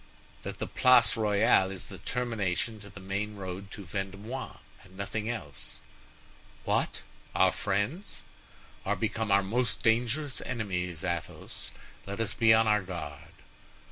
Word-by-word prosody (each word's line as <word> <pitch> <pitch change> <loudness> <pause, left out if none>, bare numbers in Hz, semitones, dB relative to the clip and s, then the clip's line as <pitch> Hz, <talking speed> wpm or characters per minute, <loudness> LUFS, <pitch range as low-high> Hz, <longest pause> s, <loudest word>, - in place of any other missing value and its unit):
"That - - -5
the - - -2
Place 125 -4 +6
Royale 105 -3 +4
is 95 -1 -4
the - - -9
termination 115 -3 -1
to 100 -1 -10
the 100 - -10
main 100 +3 -2
road 95 0 -5
to 100 - -8
Vendomois, 100 +8 -4 0.3
and 95 -1 -16
nothing 105 +2 -2
else." 95 - -4 0.9
"What! - - +1 0.3
our 95 -1 +6
friends?" 100 - -1 0.6
"Are 100 - +1
become 110 +1 -1
our 100 0 +6
most 120 +5 0
dangerous 125 +5 +2
enemies, 90 -7 -2
Athos. 85 -1 -3 0.4
Let 100 +2 -4
us 115 - +1
be 110 -1 +5
on 110 0 +7
our 105 -1 +4
guard." 85 -6 -6
100 Hz, 140 wpm, -30 LUFS, 95-115 Hz, 0.9 s, on